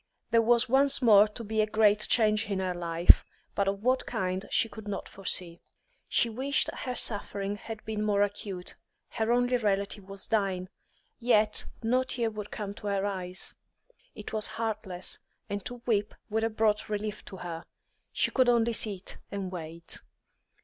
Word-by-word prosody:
There 230 - +5
was 235 +2 +4
once 275 +2 +4
more 210 -3 +8
to 215 +2 -6
be 220 0 0
a 215 - +1
great 215 -1 +3
change 215 -1 +3
in 200 - 0
her 185 -1 -1
life, 170 0 +5 0.3
but 200 - 0
of 195 +1 -1
what 255 +1 +2
kind 185 -4 -2
she - - +2
could 220 -1 -10
not 200 -1 -4
foresee. 180 -3 -2 0.5
She - - +3
wished 265 +5 +1
her 250 -1 -4
suffering 205 -2 -1
had 220 +1 -8
been 215 -1 -2
more 205 -1 +3
acute; 200 -3 -4 0.4
her 225 0 -1
only 245 +1 +3
relative 200 -2 -1
was 195 0 -6
dying, 190 -4 0 0.5
yet 220 -3 +3 0.2
no 250 +3 +3
tear 235 -3 -1
would 210 -1 -6
come 200 -2 -5
to 205 - -8
her 200 -1 0
eyes; 185 -2 -3 0.6
it - - -8
was 215 -1 +2
heartless, 215 -5 -3 0.3
and 205 -1 -3
to 245 -1 -6
weep 210 -3 0 0.2
would 220 +1 +1
have 225 -1 -2
brought 215 -1 +2
relief 210 0 -3
to 190 - -9
her. 170 -2 -6 0.5
She - - +1
could 255 -2 +4
only 235 -1 +3
sit 200 -4 -1
and 195 -2 -4
wait. 165 -1 -6
210 Hz, 170 wpm, -29 LUFS, 195-225 Hz, 0.6 s, more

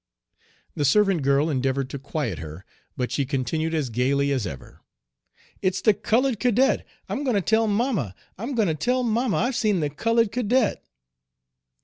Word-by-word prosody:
The 145 - -1
servant 195 +3 +3
girl 140 +2 +2
endeavored 135 -2 0
to 140 - -5
quiet 135 - -3
her, 80 +4 -9 0.3
but 125 -1 -2
she 140 - 0
continued 150 +4 -1
as 140 -6 -1
gayly 140 +4 +1
as 130 -8 0
ever: 70 -6 -10 0.8
"It's 185 0 0
the 210 +2 +4
colored 230 +3 +1
cadet! 250 +2 +2 0.2
I'm 285 - -3
going 255 -5 +1
to - - +3
tell 220 +3 +2
mamma. 205 - 0 0.2
I'm 240 +7 -5
going 220 -4 +2
to 160 - +1
tell 250 - 0
mamma 235 0 +1
I've 245 +3 0
seen 210 -5 +1
the 150 -2 -1
colored 230 +7 +1
cadet." 245 0 +1
180 Hz, 165 wpm, -24 LUFS, 140-230 Hz, 0.8 s, the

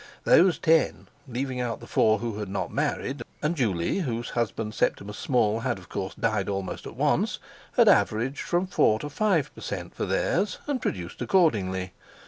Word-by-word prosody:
Those 180 +1 +5
ten, 160 -1 +2 0.2
leaving 130 +1 -3
out 120 -2 -2
the - - -11
four 110 0 +3
who 110 -1 -4
had 105 -2 -4
not - - -3
married, 130 0 -1 0.2
and 155 +3 +1
Juley, 105 - 0
whose 120 -8 -3
husband 110 -2 -2
Septimus 105 0 -1
Small 115 -4 +2
had, 120 -1 -1
of 90 - -14
course, 95 -1 -4
died 105 -3 0
almost 95 -2 -4
at - - -9
once, - - +1 0.4
had - - +5
averaged 120 +6 +3
from 175 +1 0
four 110 -11 +3
to 145 - -6
five 190 -6 +1
per - - -12
cent. - - -5
for - - -3
theirs, 195 +5 0
and 280 -4 -2
produced 90 -2 -4
accordingly. 95 - +1
120 Hz, 175 wpm, -26 LUFS, 105-150 Hz, 0.4 s, Those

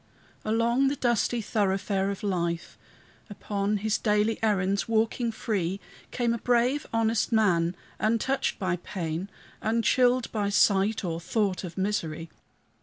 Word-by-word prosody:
Along 235 +5 +2
the 280 - 0
dusty 240 -2 0
thoroughfare 195 -1 0
of 200 0 -5
life, 170 -4 -2 0.5
Upon 205 0 -2
his 215 +1 0
daily 210 +1 +1
errands 200 -2 +1
walking 230 +1 +1
free, 195 -5 -2 0.3
Came 240 -2 0
a 235 - -3
brave, 245 +5 +1
honest 225 0 +1
man, 180 -6 +2 0.2
untouched 230 +5 0
by 185 -2 -1
pain, 170 0 -4 0.3
Unchilled 245 +2 +2
by 205 -2 -1
sight 200 +1 +3
or 165 -1 -2
thought 190 +2 -1
of 175 -1 -7
misery. 170 -5 -2
210 Hz, 125 wpm, -27 LUFS, 190-230 Hz, 0.5 s, sight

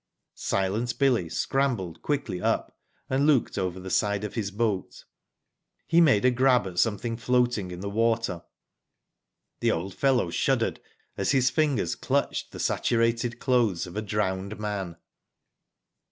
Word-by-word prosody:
Silent 105 +6 -1
Billy 130 -9 +3
scramble^ 115 -3 -1
quickly 140 -11 -2
up - - -1 0.3
and 135 +2 +1
looked 140 -6 +2
over 90 0 -2
the 95 0 -7
side 100 -1 +1
of 105 - -4
his 105 -4 -2
boat. 105 -2 -2 0.8
He 170 +1 +4
made 130 -9 +4
a 130 - +6
grab 125 -1 +3
at 90 -2 -4
something 115 +1 0
floating 120 -4 +1
in 90 0 -7
the 100 - -4
water. 115 -5 0 1.2
The - - +1
old 90 +3 -2
fellow 125 -10 +1
shuddered - - 0 0.4
as - - +1
his 130 -1 +3
fingers 145 - +1
clutched - - -1
the - - -9
saturated 115 0 +1
clothes 115 -9 +1
of 90 +1 -10
a 105 - -1
drowned 100 -1 -2
man. 100 -5 -4
110 Hz, 140 wpm, -26 LUFS, 95-125 Hz, 1.2 s, a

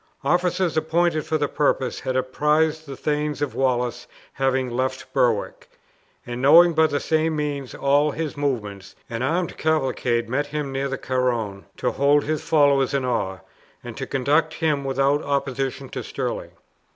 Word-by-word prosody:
Officers 175 +3 +1
appointed 160 0 +1
for 160 - +1
the 145 -1 0
purpose 135 -3 0
had 130 - -3
apprised 150 +4 +1
the 135 -1 -7
thanes 150 0 -1
of 145 -3 -2
Wallace 125 -2 -1 0.3
having 130 -1 0
left 130 +2 -3
Berwick; 115 -4 0 0.6
and 120 0 -5
knowing 170 +5 +7
by 160 0 +4
the 145 -1 -1
same 160 +1 0
means 145 -3 -3
all 145 +2 +2
his 155 0 -4
movements, 105 -9 -3 0.2
an 115 0 -3
armed 165 +6 -1
cavalcade 130 -6 0
met 145 +5 -1
him 145 -1 -4
near 135 +1 -1
the 135 - -3
Carron, 120 -6 -2
to - - 0
hold 145 +1 +3
his 155 0 -2
followers 145 -4 +3
in 135 -2 0
awe, 95 -6 -2 0.4
and - - -8
to - - -5
conduct 150 +4 +1
him 150 -4 0
without 135 +2 +1
opposition 135 -1 -2
to - - -5
Stirling. - - -4
140 Hz, 160 wpm, -23 LUFS, 130-155 Hz, 0.6 s, knowing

